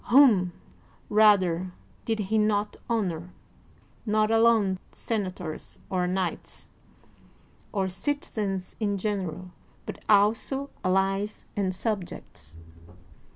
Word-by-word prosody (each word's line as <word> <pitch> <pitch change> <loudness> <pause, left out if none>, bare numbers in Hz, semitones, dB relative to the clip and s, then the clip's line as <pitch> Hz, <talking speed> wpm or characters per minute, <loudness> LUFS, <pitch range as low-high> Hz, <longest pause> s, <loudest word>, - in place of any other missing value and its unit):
Whom, 235 -9 +6 0.6
rather, 185 -4 +4 0.3
did 225 -1 0
he 215 +1 0
not 210 -1 +1
honor, 180 -6 -2 0.7
not 215 0 +2
alone 225 -4 +4
sen 220 -4 -2
ators 180 -4 -7
or 180 -1 +1
knights 185 -1 -3 1.0
or 195 -3 0
citizens 195 -4 -3
in 205 -2 0
general, 185 -3 -3 0.3
but - - -7
also 220 +7 +3
allies 195 +2 0
and 190 -2 0
subjects 185 - -5
200 Hz, 95 wpm, -27 LUFS, 185-215 Hz, 1.0 s, Whom